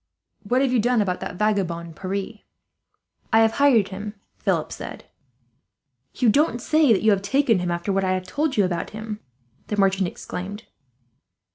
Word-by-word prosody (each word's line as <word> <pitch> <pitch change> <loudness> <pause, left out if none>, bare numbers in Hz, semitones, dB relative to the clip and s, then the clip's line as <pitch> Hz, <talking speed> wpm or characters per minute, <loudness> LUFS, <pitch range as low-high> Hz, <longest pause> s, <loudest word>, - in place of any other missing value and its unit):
"What 250 +6 +1
have 260 -2 +1
you 245 - +3
done 240 +2 +2
about 185 -3 0
that - - -6
vagabond 175 -5 -1
Pierre?" 195 +4 -4 0.9
"I 225 0 +6
have 225 0 +4
hired 240 -7 +4
him," 205 +2 -6 0.2
Philip - - 0
said. - - -8 1.1
"You 250 - +1
don't 245 +1 +3
say 305 +2 +3
that 215 - +3
you 220 - +5
have 195 -1 +2
taken 230 0 +2
him, 180 0 -2
after 175 +3 -1
what 195 0 +1
I 185 0 +1
have 185 0 -2
told 290 +8 -1
you 205 - +4
about 175 -2 -2
him!" 215 0 -6 0.5
the 210 - -3
merchant 195 -1 +2
exclaimed. 195 +5 -7
205 Hz, 170 wpm, -23 LUFS, 190-230 Hz, 1.1 s, I